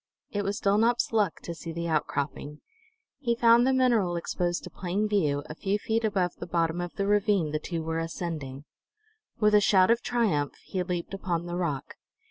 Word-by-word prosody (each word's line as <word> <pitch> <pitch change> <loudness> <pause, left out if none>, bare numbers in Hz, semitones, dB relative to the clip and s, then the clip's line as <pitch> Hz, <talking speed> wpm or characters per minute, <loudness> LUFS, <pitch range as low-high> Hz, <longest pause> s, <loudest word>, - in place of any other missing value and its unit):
It 205 -1 -1
was 200 +2 -2
Dulnop's 225 +4 +2
luck 210 -6 +1
to 170 - -5
see 165 0 -7
the 170 +1 -3
outcropping. 150 -1 -2 0.6
He 235 -5 0
found 235 +1 +5
the - - +4
mineral 235 -9 +2
exposed 175 +1 -2
to - - -9
plain 190 +4 -1
view, 150 -9 +1
a - - -7
few 195 +5 -1
feet 225 +2 -1
above 190 -5 0
the - - -7
bottom 170 0 0
of 175 -1 -6
the 200 - -1
ravine 205 -5 +2
the 155 - -1
two 165 +1 -4
were 160 0 -2
ascending. 160 -5 -5 0.7
With 210 -1 +4
a 210 - +6
shout 195 0 +5
of 235 0 +2
triumph 200 - 0
he 185 - -2
leaped 180 0 -3
upon 175 -3 -2
the 175 0 -4
rock. 165 -6 -3
180 Hz, 190 wpm, -28 LUFS, 165-210 Hz, 0.7 s, a